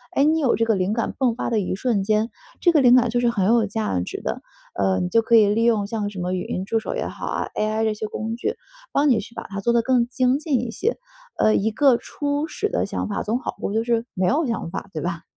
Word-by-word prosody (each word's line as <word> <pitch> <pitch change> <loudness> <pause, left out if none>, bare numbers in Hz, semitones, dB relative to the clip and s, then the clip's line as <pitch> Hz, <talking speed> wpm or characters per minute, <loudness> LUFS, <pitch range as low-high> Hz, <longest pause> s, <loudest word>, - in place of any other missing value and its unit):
诶， 275 - +4
你 315 +1 +3
有 275 -5 +2
这 230 - +1
个 225 - +2
灵 185 +1 0
感 230 0 -2
爆 255 -3 +2
发 230 - -3
的 225 - +2
一 185 -2 -2
瞬 210 -1 0
间， 215 +2 +1 0.3
这 345 - +5
个 320 - +4
灵 250 -1 +7
感 250 -1 +4
就 240 - +1
是 240 0 +2
很 205 -5 0
有 225 +2 +4
价 210 - -1
值 90 - -5
的。 - - -3 0.3
呃， 95 -1 +1
你 180 - 0
就 230 +5 +4
可 230 +1 +3
以 215 -2 +7
利 225 +2 +1
用 220 -4 +2
像 210 -2 -2
什 200 -2 -8
么 180 +1 -2
语 180 -1 -2
音 185 - -3
助 225 +3 0
手 220 - -5
也 - - -2
好 - - -7
啊 - - -2
，AI 215 +1 0
这 220 -1 +1
些 215 0 -4
工 220 +1 -4
具， 425 - -2 0.4
帮 290 +1 +2
你 245 - +4
去 230 +3 -10
把 - - -5
它 200 0 -5
做 220 +4 +1
得 235 - +4
更 245 -1 +2
精 255 +1 +1
进 295 -6 0
一 245 -2 -4
些。 450 - -1 0.4
嗯， 215 - +3
一 220 +3 0
个 265 +1 +4
初 290 +4 -3
始 420 +6 -2
的 - - 0
想 - - -3
法 200 - -2
总 225 +4 -1
好 - - -5
过， 200 - -3
就 225 +1 +1
是， 235 -1 0
没 185 -2 0
有 300 - +2
想 230 -8 -3
法， 195 +1 -6
对 155 - -4
吧？ 170 -1 -4
225 Hz, 305 characters per minute, -23 LUFS, 205-250 Hz, 0.4 s, 灵